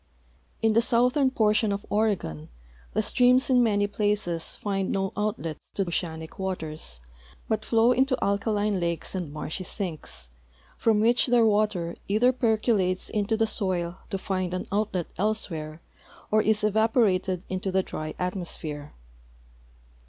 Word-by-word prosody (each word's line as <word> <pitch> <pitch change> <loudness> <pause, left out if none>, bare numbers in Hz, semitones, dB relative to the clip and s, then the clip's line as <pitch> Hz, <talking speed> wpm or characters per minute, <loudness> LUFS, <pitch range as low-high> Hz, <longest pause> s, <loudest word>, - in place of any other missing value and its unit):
In 225 -1 +4
the 230 - +5
southern 250 +3 +3
portion 215 -3 +2
of 200 +1 -3
Oregon 190 - 0 0.4
the 215 - +1
streams 250 +3 +4
in 250 -1 +5
many 205 -3 +3
])laces 205 -5 -1
find 195 -2 -2
no 195 0 -1
outlet 210 -6 -2 0.2
to 195 - +1
oceanic 160 -2 -4
waters, 155 - -4 0.5
but 220 -1 -1
flow 230 +2 +4
into 260 +1 +2
alkaline 205 0 0
lakes 170 -1 -2
and 180 -6 -4
marshy 155 +4 -4
sinks, 170 - -4 0.5
from 220 -2 +2
which 235 +3 +4
their 240 -2 +4
water 205 -5 +1
either 220 +5 +4
percolates 215 -6 +1
into 210 +1 0
the 225 - +3
soil 185 -4 -1
to 195 - -2
find 185 -1 -2
an 185 - -3
outlet 200 -4 0
elsewhere 170 -7 -2 0.5
or 215 0 +5
is 215 0 +1
evaporated 210 -4 +2
into 185 +1 -2
the 190 0 +2
dry 155 -3 -6
atmosphere. 165 -5 -4
200 Hz, 135 wpm, -26 LUFS, 180-220 Hz, 0.5 s, the